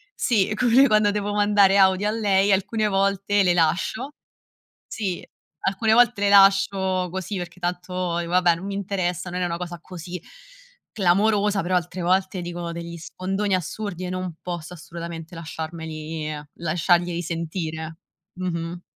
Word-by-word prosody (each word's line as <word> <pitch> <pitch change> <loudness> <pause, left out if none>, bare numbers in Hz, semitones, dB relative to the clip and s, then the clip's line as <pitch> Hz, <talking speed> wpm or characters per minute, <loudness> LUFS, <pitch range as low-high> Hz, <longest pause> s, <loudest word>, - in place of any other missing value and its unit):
sì 215 -4 +1
come 255 +4 +5
quando 215 -3 +4
devo 205 0 -2
mandare 205 -1 +4
audio 190 +1 +4
a - - +1
lei, 205 -3 +2
alcune 205 +3 +1
volte 200 0 +1
le 180 -2 +3
lascio 175 - 0 0.8
sì, 190 -5 -3 0.4
alcune 220 +3 +1
volte 240 -3 +4
le 205 - +3
lascio 195 -2 +4
così 190 +3 -4
perché 175 0 -7
tanto 180 0 -2
dico: 170 0 -3
"Vabbè, 180 -1 +4
non 175 +4 -7
mi 200 - -4
interessa, 185 -2 -2
non 180 +1 -3
è - - +1
una 170 -1 -2
cosa 175 -1 -6
così 180 0 -8 0.7
clamorosa." 205 +1 +2
Però 180 +2 +1
altre 180 +1 -2
volte 185 +1 +1
dicono 175 0 -5
degli 170 0 -6
sfondoni 190 +4 -2
assurdi 185 +1 -3
e - - -4
non 185 -2 -4
posso 175 -1 -5
assolutamente 170 0 -8
lasciarmeli 160 -1 -5 0.2
lasciarglieli 175 +1 +1
sentire. 160 -1 -4 0.4
Mh-mh. 175 -1 -4
185 Hz, 145 wpm, -24 LUFS, 170-200 Hz, 0.8 s, come